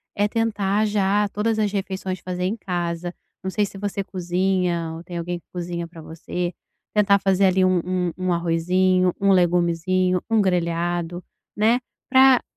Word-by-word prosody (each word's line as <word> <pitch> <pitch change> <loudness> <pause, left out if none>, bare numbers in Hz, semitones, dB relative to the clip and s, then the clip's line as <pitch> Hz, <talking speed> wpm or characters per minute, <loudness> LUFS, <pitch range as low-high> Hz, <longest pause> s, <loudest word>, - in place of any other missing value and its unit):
é 205 +1 +2
tentar 210 -2 0
já 205 0 +1
todas 220 +2 -1
as 210 -2 +1
refeições 190 -2 -3
fazer 180 0 -4
em 205 +5 -1
casa, 175 -3 -3 0.3
não 190 - -2
sei 210 +1 +1
se 195 - -11
você 200 0 -3
cozinha 180 -2 -1
ou 165 - -9
tem 175 0 -7
alguém 175 +1 -3
que - - -34
cozinha 175 -1 -4
pra 165 -1 -12
você, 175 +2 -4 0.4
tentar 200 -1 +4
fazer 195 0 +3
ali 185 0 +3
um 185 -1 +3
um 180 -1 -1
um 185 -1 0
arrozinho, 180 +2 +2
um 200 0 +4
legumezinho, 180 +1 +2
um 225 -1 +4
grelhado, 175 -1 -1 0.3
né, 225 +4 +3 0.3
pra 260 -1 +6
185 Hz, 160 wpm, -23 LUFS, 175-200 Hz, 0.4 s, pra